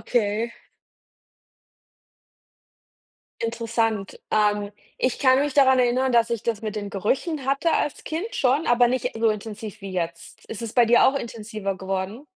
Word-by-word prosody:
okay. 220 +1 +1 2.9
Interessant. 230 -3 -1
Ähm, 210 -1 +2 0.3
ich 255 - 0
kann 260 0 +5
mich 290 -1 0
daran 265 -2 +5
erinnern, 250 +1 +2
dass 235 -1 +3
ich 235 -3 -2
das 225 -3 -1
mit 215 -1 -4
den 205 -1 -4
Gerüchen 265 - -1
hatte 280 +5 +1
als 295 - -1
Kind 345 +9 -4
schon, 275 +4 +2
aber 240 0 +5
nicht 250 0 -1
so 225 0 +3
intensiv 215 0 -5
wie 195 - -6
jetzt. 170 -2 -5
Ist 220 - -7
es 230 -2 -5
bei 245 -2 +5
dir 240 +1 +5
auch 265 - +2
intensiver 215 -4 -5
geworden? 190 +7 -4
230 Hz, 150 wpm, -24 LUFS, 210-255 Hz, 2.9 s, kann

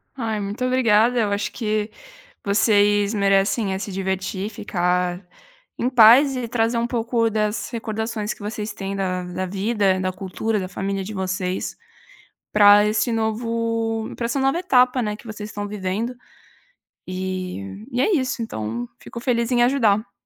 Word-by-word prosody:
Ai 225 -4 -2
muito 205 +5 -3
obrigada, 245 -1 +3
eu 210 -2 +1
acho 200 +1 -1
que 215 -2 -1 0.5
vocês 205 0 +3
merecem 195 0 +2
é 190 - -3
se 200 - -5
divertir, 190 +1 -2
ficar 180 -2 -1 0.5
em 245 - +1
paz 255 +3 +7
e 245 -2 -3
trazer 230 0 +1
um 235 - +1
pouco 230 -1 0
das 215 0 -1
recordações 220 -2 -3
que - - -18
vocês 210 +1 -4
têm 195 0 -5
da 185 -2 -2
da 180 +1 -4
vida, 195 0 +1
da 185 0 -1
cultura, 200 +3 -2
da 185 - -4
família 195 +1 -3
de 210 +3 -7
vocês, 190 -1 -3 0.8
pra 205 0 +7
esse 220 +3 +1
novo 225 0 -1
para 235 - -3
essa 235 +4 -1
nova 270 +4 +2
etapa, 255 -7 +3
né, 210 -2 -2
que 230 - -14
vocês 210 -1 -7
estão 205 0 -5
vivendo. 210 +4 -3 0.9
E 185 - -5
e 245 0 0
é 425 - +2
isso 260 -4 -1
então, 115 - -4
fico 235 - -9
feliz 235 -1 0
em 240 -1 +3
ajudar. 220 -5 +2
210 Hz, 155 wpm, -22 LUFS, 195-230 Hz, 0.9 s, paz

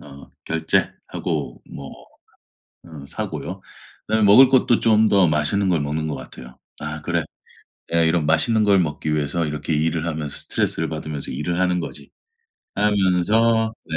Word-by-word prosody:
어 70 -1 -13
결제하고 80 -6 -2
뭐 70 -1 -9 0.9
어 80 -5 -11
사고요. - - -5 0.5
그다음에 110 -1 +2
먹을 125 +6 +8
것도 125 -3 +3
좀 110 -1 +4
더 95 -4 +4
맛있는 80 +6 +1
걸 85 -4 +2
먹는 75 +2 -2
것 75 - -3
같아요. 65 -2 -11 0.2
'아 75 0 -6
그래 85 0 -1 0.6
내가 85 - +1
이런 80 -1 +2
맛있는 110 +8 +2
걸 100 -2 +4
먹기 75 -1 -2
위해서 75 +3 -1
이렇게 75 +1 -3
일을 80 +2 0
하면서 75 -3 -4
스트레스를 80 0 -2
받으면서 75 -2 -5
일을 85 +6 -2
하는 90 -1 +1
거지.' - - -8 0.7
하면서 105 +3 +2
네. 80 - -4
80 Hz, 315 characters per minute, -22 LUFS, 75-100 Hz, 0.9 s, 먹을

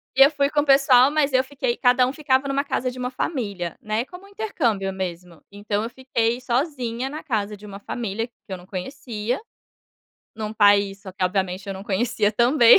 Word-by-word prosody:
E 270 - +9
eu 280 - +6
fui 280 -1 +1
com 295 -1 +2
o - - -3
pessoal 270 -1 +6
mas 295 -2 +1
eu 260 0 +4
fiquei 260 -3 -2
cada 250 0 +4
um 260 - -3
ficava 275 -2 +1
em 275 - -1
uma 275 +1 +1
casa 260 -2 -1
de 255 - -11
uma 250 +1 -2
família, 200 - -3
né, 215 +3 -1
como 360 +6 -12
um - - -15
intercâmbio 235 - -1
mesmo. 180 -3 -6
Então, 205 +1 -2
eu 230 - -3
fiquei 240 -1 -1
sozinha 250 -1 -1
na 305 +2 -7
casa 210 -4 -2
de 210 - -13
uma 200 -1 -8
família 225 +1 -3
que 240 - -41 0.2
eu 190 - -4
não 180 - -14
conhecia, 215 +4 -4 1.0
num 215 -1 -4
país, 205 -2 +4
só 190 - -9
que 185 - -6
obviamente 185 0 -1
eu 195 - -3
não 190 - -7
conhecia, 215 +1 +1
também. 240 - +7
235 Hz, 210 wpm, -23 LUFS, 200-265 Hz, 1.0 s, E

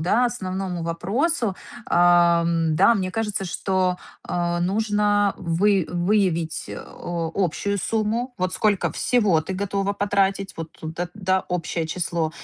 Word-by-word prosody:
да, 210 +9 +3
основному 190 -6 -4
вопросу, 205 - 0 0.3
ам, 170 -2 +4
да, 200 +7 +6
мне 185 -3 -1
кажется, 210 -1 -2
что, 190 +1 -1 0.4
а, 175 0 -1
нужно 205 +1 +1
вы 185 +2 +2
выявить, 175 -3 0
э, - - -6
о 165 -2 -5
общую 200 +2 0
сумму. 225 +5 -1
Вот 185 0 -1
сколько 205 -1 +1
всего 210 -10 +2
ты 160 +4 -5
готова 200 +1 -1
потратить, 195 -1 0
вот 165 -1 -5
это, 165 +3 -4
да, 190 -2 +1
общее 170 -2 -2
число. 165 -1 -1
185 Hz, 130 wpm, -23 LUFS, 170-205 Hz, 0.4 s, да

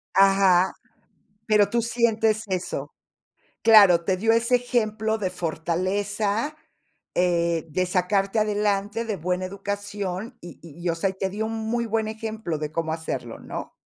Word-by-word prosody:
Ajá. 195 -2 +5 0.7
Pero 210 -2 +4
tú 235 +2 +1
sientes 225 -2 +1
eso. 185 -2 -3 0.7
Claro, 200 -6 +7
te 185 0 +1
dio 225 +3 +2
ese 230 +2 +3
ejemplo 220 -3 0
de 190 -3 -2
fortaleza, 200 - -1 0.6
eh, 170 -2 +1
de 185 +4 0
sacarte 195 +3 +1
adelante, 210 +1 0
de 215 -4 -3
buena 180 +3 -2
educación 200 +2 -5
y 175 - -11
y 165 0 -13
y - - +2
o 165 - 0
sea, 190 +3 0
y - - -5
te 190 0 -2
dio 215 +3 -3
un 225 - -4 0.2
muy 235 0 0
buen 220 0 -1
ejemplo 220 -6 -4
de 150 0 -4
cómo 160 0 -2
hacerlo, 160 0 -5
¿no? - - -7
200 Hz, 150 wpm, -24 LUFS, 180-220 Hz, 0.7 s, Claro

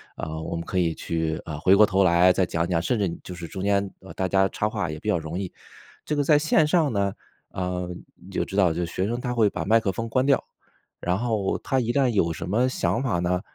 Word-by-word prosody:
呃， 80 0 -5
我 80 - -4
们 85 - -3
可 95 - -3
以 85 -2 +2
去， 80 -1 -2
呃， 75 -2 -5
回 95 +4 +5
过 105 +1 +7
头 95 -1 +2
来 90 +1 +5
再 95 0 +2
讲 85 0 -1
讲， 85 -2 +1
甚 120 +6 0
至 100 -3 +1
你 85 - -6
就 90 - -8
是 85 -1 -7
中 95 - -6
间， 100 -1 +1
呃， 95 - -12
大 95 - -2
家 95 0 +3
插 105 - -1
话 105 -6 -2
也 75 - -5
比 105 - -4
较 100 - +3
容 80 +2 -5
易。 95 -2 -4 0.5
这 150 - -1
个 145 - +1
在 150 0 +4
线 155 0 +3
上 155 -5 +2
呢， 100 -1 0 0.4
呃， 90 -1 -3 0.3
你 95 - -15
就 - - -1
知 95 - -8
道 90 -5 +4
就 85 +1 -2
学 95 +3 -2
生 120 +3 -2
他 125 -1 -3
会 110 -4 +3
把 80 - -4
麦 115 +2 +4
克 95 - 0
风 115 +4 -4
关 130 +3 +1
掉， 140 -1 +3 0.6
然 90 +1 0
后 110 -4 -1
他 130 - -1
一 120 - -1
旦 135 +1 +2
有 85 -7 +1
什 80 - -5
么 120 +5 +2
想 130 -1 -1
法 120 -10 0
呢， 90 +1 0
95 Hz, 285 characters per minute, -25 LUFS, 85-115 Hz, 0.6 s, 过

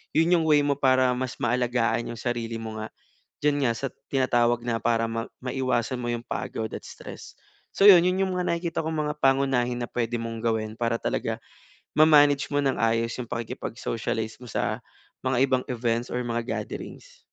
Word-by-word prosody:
'yon 165 +2 +4
'yong 165 - +1
way 150 -1 +5
mo 140 -1 +2
para 130 -1 +4
mas 130 -1 -3
maalagaan 120 -1 +1
yung 115 - -9
sarili 115 -2 -2
mo 110 -1 -6
nga, 110 - -4 0.6
diyan 145 -1 +2
nga - - +2
sa 135 - -2 0.3
tinatawag 120 -3 +2
na 115 -1 0
para 115 -1 +2
mai 115 0 -3 0.2
maiwasan 130 -1 -1
mo 120 - -3
'yong 120 0 -5
pagod 110 -1 -3
at - - -6
stress. - - -10 0.4
So 200 - +5
'yon 180 -4 +10
yung 185 0 +1
mga 180 - 0
nakikita 170 -1 -1
kong 160 0 -2
mga 150 - -2
pangunahin 135 -2 +2
na 120 - -2
puwede 120 0 -1
mong 115 0 -5
gawin 110 -1 0
para 115 -1 +1
talaga, - - -2 0.6
ma-manage 145 -2 +6
mo 145 - +2
ng 135 -2 +1
maayos 115 +1 +1
'yong 120 -2 -6
pakikipag-socialize 115 -1 -3
mo - - -9
sa - - -1 0.4
mga 130 -1 +1
ibang 130 -1 +2
events 120 -1 -1
or 125 - -1
mga 120 -1 -2 0.2
gatherings. - - -9
125 Hz, 180 wpm, -26 LUFS, 115-140 Hz, 0.6 s, yon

